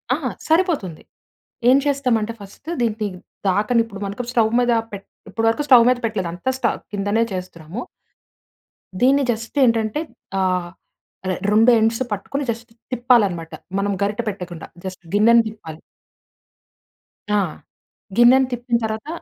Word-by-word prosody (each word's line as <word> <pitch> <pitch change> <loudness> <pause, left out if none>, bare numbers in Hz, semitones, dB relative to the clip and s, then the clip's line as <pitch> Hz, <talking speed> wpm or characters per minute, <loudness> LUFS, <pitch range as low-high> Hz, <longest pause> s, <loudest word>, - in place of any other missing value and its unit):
ఆ! - - -3 0.3
సరిపోతుంది. 315 - +1 0.7
ఏం 260 - +7
చేస్తామంటే 250 -6 +1
ఫస్ట్ 200 +9 -14
దీన్ని 225 -2 0
ది 210 - +1 0.4
దాకనిప్పుడు 210 +1 -1
స్టవ్ 225 -3 +2
మీద 245 0 +2 0.2
పెట్ 200 -1 -8 0.2
ఇప్పటి 225 +3 -2
వరకు 260 +6 0
స్టవ్ 245 -3 +8
మీద 250 - +3
పెట్టలేదు 195 -6 -2
అంత 180 +9 -3
స్ట - - -3 0.3
కిందనే 205 +3 +1
చేస్తున్నాము. 180 +1 -6 1.2
దీన్ని 275 +2 +4
జస్ట్ 225 +4 -6
ఏంటంటే 230 +2 +2 0.4
ఆహ్, 185 -2 0 0.8
2 225 +3 +6
ఎండ్స్ 225 +2 +1
పట్టుకొని 275 +8 -3
జస్ట్ 230 +1 -9 0.2
తిప్పాలన్నమాట. 215 -10 +2 0.3
మనం 200 +1 0
గరిట 205 +3 -1
పెట్టకుండా 180 -4 -7 0.2
జస్ట్ 185 -1 -7
గిన్నెని 230 +3 +6
తిప్పాలి. 165 -8 -9 1.6
ఆ! - - +4 0.8
గిన్నెను 255 +2 +6
తిప్పిన 245 0 -1
తరువాత 220 +4 -3
220 Hz, 120 wpm, -21 LUFS, 200-245 Hz, 1.6 s, స్టవ్